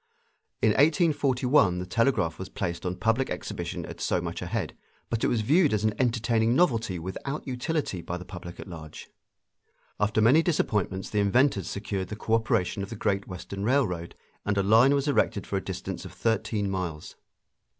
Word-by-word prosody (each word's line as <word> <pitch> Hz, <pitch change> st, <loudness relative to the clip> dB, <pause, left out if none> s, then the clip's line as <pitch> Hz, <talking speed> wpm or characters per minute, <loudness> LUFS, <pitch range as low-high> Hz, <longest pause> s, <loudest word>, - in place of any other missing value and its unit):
In -, -, +6 dB
1841 140 Hz, -, +3 dB
the 90 Hz, -, -3 dB
telegraph 90 Hz, -5 st, +1 dB
was 95 Hz, -, -6 dB
placed 85 Hz, -1 st, -3 dB
on 90 Hz, -, -2 dB
public 115 Hz, +7 st, +1 dB
exhibition -, -, -4 dB
at -, -, -9 dB
so -, -, +1 dB
much -, -, -5 dB
a -, -, -4 dB
head, -, -, -3 dB, 0.4 s
but 115 Hz, -1 st, -1 dB
it -, -, +4 dB
was 115 Hz, -, +1 dB
viewed 150 Hz, -, +3 dB
as 105 Hz, -, -1 dB
an 110 Hz, -1 st, +2 dB
entertaining 115 Hz, -1 st, +2 dB
novelty 115 Hz, -, +2 dB
without 95 Hz, -, -5 dB
utility 130 Hz, -, -2 dB
by 90 Hz, +1 st, -4 dB
the 90 Hz, -, -9 dB
public 90 Hz, -2 st, -9 dB
at -, -, -8 dB
large. 80 Hz, -4 st, -10 dB, 0.9 s
After 105 Hz, +2 st, +1 dB
many 125 Hz, +9 st, +6 dB
disappointments 105 Hz, -, -1 dB
the 105 Hz, -, +1 dB
inventors 100 Hz, +1 st, +2 dB
secured 100 Hz, -2 st, -3 dB
the 105 Hz, -, -5 dB
cooperation 110 Hz, -3 st, 0 dB
of 100 Hz, -, -5 dB
the 115 Hz, -, -6 dB
Great 100 Hz, -1 st, -1 dB
Western 95 Hz, +1 st, -6 dB
Railroad, 100 Hz, -9 st, 0 dB, 0.3 s
and 105 Hz, 0 st, -1 dB
a 100 Hz, -, +3 dB
line 115 Hz, +7 st, +5 dB
was 140 Hz, +1 st, 0 dB
erected 145 Hz, -, +1 dB
for -, -, -2 dB
a -, -, -3 dB
distance -, -, -5 dB
of -, -, -9 dB
thirteen 110 Hz, -2 st, 0 dB
miles. 90 Hz, -5 st, -4 dB
110 Hz, 180 wpm, -27 LUFS, 95-130 Hz, 0.9 s, In